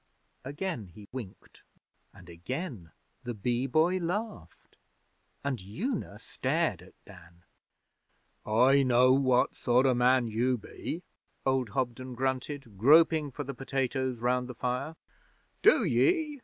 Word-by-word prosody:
Again 145 - -4
he 100 +4 -14
winked, 120 -7 -10 0.5
and 90 -3 -16
again 95 - -6 0.3
the 120 -2 -5
Bee 120 +5 -1
Boy 165 +7 +2
laughed 180 - -5 0.7
and 140 -6 -2
Una 160 - -4
stared 130 - -1
at 90 - -17
Dan. 90 -3 -16 1.0
'I 125 +6 +4
know 130 -1 +4
what 130 -2 +2
sort 125 +1 +2
o' 130 - +4
man 125 0 +3
you 120 +3 0
be,' 160 - -7 0.4
old 130 -3 +1
Hobden 130 0 -3
grunted, 130 -3 -3
groping 155 +4 +5
for 145 +2 -6
the 140 0 -6
potatoes 130 -1 -2
round 125 +1 0
the 125 - -7
fire. 125 +7 -3 0.7
'Do - - +5
ye?' 315 -5 +1
130 Hz, 125 wpm, -29 LUFS, 115-140 Hz, 1.0 s, groping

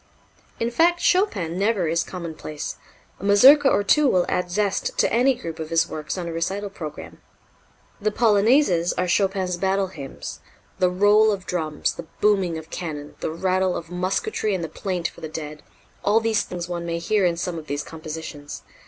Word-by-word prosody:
In 230 +1 -1
fact 345 +6 +3
Chopin 190 - +1
never 200 -4 +1
is 165 +1 +1
commonplace. 160 -4 -6 0.4
A - - -12
Mazurka 270 +8 +7
or 205 - +2
two 300 +8 +4
will 180 -8 +3
add 180 0 -1
zest 200 +2 -1
to - - +2
any 255 +3 +4
group 165 -7 -7
of 160 -1 -5
his 165 0 +2
works 155 +3 -5
on 175 -2 -4
a - - -4
recital 190 +5 -2
program. 155 -6 -8 0.8
The 215 - +2
Polonaises 210 - +3
are 180 - 0
Chopin's 190 -1 +1
battle 190 +1 0
hymns. 140 -7 -8 0.4
The 180 - +4
roll 205 +4 +4
of 195 -2 -4
drums, 155 -4 -1
the - - -9
booming 195 -5 +2
of 160 0 -10
cannon, 150 -4 -5
the - - -2
rattle 185 +2 0
of 165 0 -8
musketry 190 - -1
and 175 - -3
the 165 - -4
plaint 180 -4 -2
for - - -14
the 160 - -5
dead 150 -1 -7 0.4
all 210 +2 +4
these 225 -2 +1
things 175 -1 -5
one 175 -1 -4
may 170 0 -1
hear 195 +4 +1
in 175 -2 +2
some 175 -1 -3
of 155 - -12
these 145 0 -2
compositions. 155 -2 -8
180 Hz, 185 wpm, -23 LUFS, 165-205 Hz, 0.8 s, Mazurka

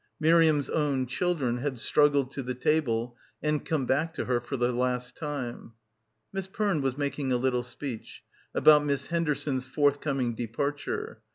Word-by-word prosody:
Miriam's 160 -2 +4
own 140 -4 0
children 130 -2 0
had 130 +1 -3
struggled 140 +1 +3
to 140 - -4
the 125 0 -4
table 125 -4 0 0.3
and 150 -1 0
come 150 -5 -1
back 155 +6 0
to - - -2
her 125 -1 +1
for 120 +3 -4
the 120 0 +1
last 125 0 -1
time. 140 -7 -5 0.6
Miss 195 -1 -3
Perne 195 -5 0
was 135 -1 -1
making 140 -2 -2
a 125 - +3
little 125 0 +1
speech... 125 -1 -7 0.3
about 150 -1 +7
Miss 140 -2 0
Henderson's 150 -5 -1
forthcoming 140 -2 +1
departure. 125 +6 -3
140 Hz, 155 wpm, -28 LUFS, 125-150 Hz, 0.6 s, about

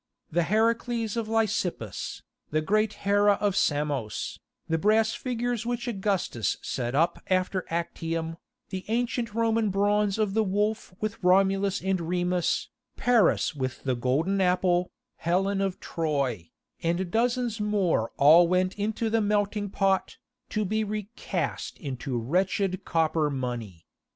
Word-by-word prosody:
The 175 +2 +2
Heracles 230 +1 +1
of 230 -2 -2
Lysippus, 200 - -1 0.3
the 155 - +1
great 215 +5 +1
Hera 205 0 +5
of 200 -1 0
Samos, 145 - -1 0.3
the 165 0 0
brass 220 +3 +3
figures 245 -2 -2
which 240 +1 -3
Augustus 195 - -1
set 120 0 -2
up 165 +3 +2
after 185 0 0
Actium, 165 -1 -3 0.3
the 190 -1 -4
ancient 235 0 -1
Roman 225 -1 +2
bronze 205 +1 +2
of 210 -3 0
the 220 +1 +3
Wolf 210 +2 -1
with 215 -1 -4
Romulus 195 +1 +3
and 190 -2 0
Remus, 175 +1 0 0.3
Paris 240 -6 +3
with 130 -3 -4
the 130 - +1
Golden 150 +11 +1
Apple, 180 -1 +2 0.3
Helen 195 +3 +1
of 195 -2 -1
Troy, 140 - -2 0.3
and 170 +2 -1
dozens 240 0 0
more 200 - +1
all 160 +5 +7
went 185 +1 +1
into 220 +2 -1
the 225 0 +2
melting 205 0 0
pot, 195 -1 0 0.3
to 215 -1 -1
be 215 +3 0
recast 210 +1 -4
into 130 -3 -4
wretched 185 - 0
copper 160 -2 +1
money. 120 - -5
195 Hz, 130 wpm, -27 LUFS, 165-215 Hz, 0.3 s, all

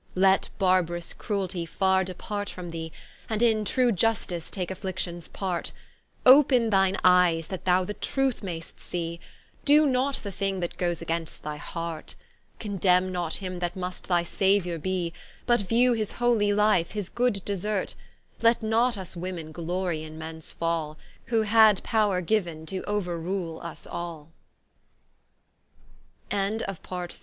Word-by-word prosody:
Let 190 +1 +4
barb'rous 180 -3 +1
crueltie 190 -5 -3
farre 190 +2 +2
depart 205 +3 -4
from 175 -2 -7
thee, 160 -1 -5 0.4
And 220 +1 0
in 220 -2 +3
true 250 +3 +2
Iustice 185 -4 0
take 185 -2 -3
afflictions 185 -3 -4
part; 185 -3 -3 0.5
Open 255 -4 +7
thine 195 -1 +3
eies, 180 -3 +5
that 190 - -6
thou 185 0 +4
the 210 - -4
truth 270 +2 -1
mai'st 170 -5 -6
see, 170 -1 -4 0.4
Doe 300 +2 +6
not 265 0 +1
the 200 - -5
thing 195 0 -2
that 175 -1 -4
goes 175 -2 -1
against 165 -1 -3
thy 150 0 -4
heart; 165 +1 -6 0.4
Condemne 185 -3 +2
not 175 -3 -2
him 185 -2 -5
that 175 0 -2
must 180 -1 -5
thy 175 -2 +2
Sauiour 180 -2 +1
be; 180 -2 -1 0.3
But 240 -3 +3
view 240 +5 +3
his 215 -3 -2
holy 235 -4 +2
Life, 205 -5 +3
his 205 -4 -3
good 240 -5 0
desert: 200 0 -1 0.5
Let 230 0 +4
not 230 +3 +2
vs 190 -2 -7
Women 170 -3 -5
glory 175 0 -2
in 155 0 -9
Mens 160 0 -7
fall, 165 -2 -2 0.3
Who 230 -2 +2
had 215 -2 +5
power 205 -5 +1
185 Hz, 130 wpm, -27 LUFS, 175-215 Hz, 0.5 s, Open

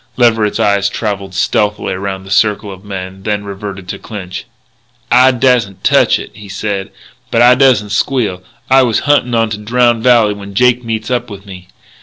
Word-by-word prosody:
Leverett's 115 -4 +2
eyes 100 -1 +2
travelled 100 -4 -4
stealthily 105 +2 0
around 95 0 -5
the 95 - -11
circle 105 +1 +1
of 95 0 -11
men, 95 -1 -7
then 105 +1 -2
reverted 100 -1 -7
to - - -6
Clinch. 95 -4 -8 0.7
"I 125 +2 +6
dassn't 120 -6 0
touch - - +3
it," - - -9
he 105 -2 -12
said, 100 0 -3 0.4
"but 115 +1 +3
I 125 +1 +7
dassn't 125 -6 +3
squeal.... 105 -5 -1 0.3
I 135 0 +5
was 120 -4 +1
huntin' 145 -4 +1
onto 110 -2 -1
Drowned 120 0 +2
Valley 120 -4 +4
when 100 -1 -10
Jake 125 +2 +3
meets 110 +1 -4
up 120 -1 -1
with 100 -1 -10
me." 90 -2 -11
105 Hz, 175 wpm, -14 LUFS, 100-120 Hz, 0.7 s, I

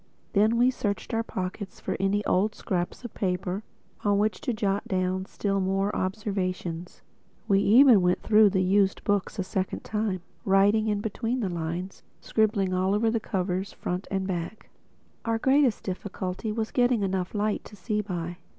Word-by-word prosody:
Then 215 +3 +4
we 245 +2 +4
searched 205 -1 -3
our 225 - +2
pockets 190 -2 -5
for - - -3
any 200 +2 +1
odd 210 +4 +2
scraps 180 +5 -3
of 240 - -7
paper 185 0 -2 0.4
on 205 -1 +3
which 210 -2 0
to - - -1
jot 205 -3 -1
down 185 0 -1
still 195 -1 -1
more 195 +2 0
observations. 185 -3 -3 0.4
We 195 -2 +4
even 230 +1 +7
went 180 0 +1
through 215 -1 +6
the 190 -1 +1
used 195 +1 +2
books 205 +1 0
a 190 - 0
second 185 0 -2
time, 210 -4 -2 0.2
writing 205 +3 +4
in 205 -1 0
between 225 +4 -2
the 200 - -1
lines, 175 +2 -4 0.2
scribbling 205 -4 +1
all 185 +2 +2
over 220 +1 +2
the 230 - +1
covers, 190 -2 -2
back 180 +2 -3
and 190 -1 -1
front. 180 +2 -3 0.7
Our 230 0 0
greatest 265 -1 +3
difficulty 190 +2 -4
was 220 0 -2
getting 245 -4 +2
enough 190 0 -2
light 210 0 0
to 210 - -12
see 210 +2 -1
by. 175 -3 -4
200 Hz, 170 wpm, -27 LUFS, 185-215 Hz, 0.7 s, even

